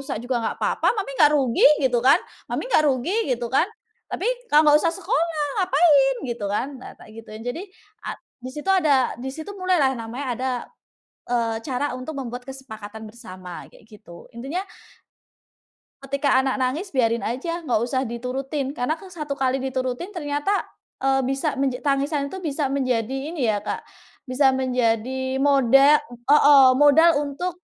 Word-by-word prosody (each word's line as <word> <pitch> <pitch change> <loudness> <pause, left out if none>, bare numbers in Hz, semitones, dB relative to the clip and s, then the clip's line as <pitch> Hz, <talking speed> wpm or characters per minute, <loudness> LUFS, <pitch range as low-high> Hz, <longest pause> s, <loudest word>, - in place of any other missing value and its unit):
rusak 275 0 -5
juga 245 -1 -1
nggak 225 - -3
papa, - - +1
mami 390 -8 -3
nggak 300 -1 +6
rugi," 260 -5 +3 0.2
gitu 245 -2 +2
kan. 260 +5 +6 0.3
"Mami - - -3
gak 305 - +4
rugi" 265 +6 -1 0.2
gitu 240 0 -4
kan, 330 +8 +3 0.4
"tapi - - -4 0.2
kau 300 +1 +5
nggak 295 0 +6
usah 335 0 +1
sekolah, 320 -1 -1 0.2
ngapain?" 290 -6 +4
gitu 235 -5 -4
kan, 210 +7 -1
nah, - - -11
tak 215 - -15
gituin. 225 0 -10
Jadi 330 +12 -5 0.4
a - - -4 0.2
di 255 - -7
situ 300 +6 -3
ada 295 -9 +3
di 265 - -5
situ 320 +6 -7
mulai 370 -1 +1
lah 265 0 +3
namanya 235 +5 -6
ada, 260 +2 -2 0.8
eee, 230 -2 0
cara 270 0 -2
untuk 265 +4 -7
membuat 245 -1 -5
kesepakatan 220 -5 -9
bersama 185 -6 -10
kayak - - -19
gitu. 210 -6 -14
Intinya 270 +9 -4 1.4
ketika 280 0 +1
anak 265 0 0
nangis 300 +8 -2
biarin 230 -3 +1
aja, 275 +9 -3
nggak 240 -5 +1
usah 260 +1 -1
diturutin 265 +4 -4
karena 285 +1 -1
ke 375 +3 -13
satu 300 -5 -5
kali 265 -1 0
diturutin 260 +7 -3
ternyata, 295 +4 -1 0.4
eee, 270 0 +2
bisa 270 +2 -1
menja 265 -2 -1
tangisan 280 0 0
itu 380 - -6
bisa 295 -5 -2
menjadi 270 +3 -2
ini 295 - -3
ya, 210 - 0
Kak, 205 - -5 0.4
bisa 265 0 +2
menjadi 260 +1 -1
modal 275 +1 +5 0.3
heeh, 285 -2 +7
modal 295 +4 +6 0.2
untuk 350 +5 -4
270 Hz, 160 wpm, -23 LUFS, 245-295 Hz, 1.4 s, heeh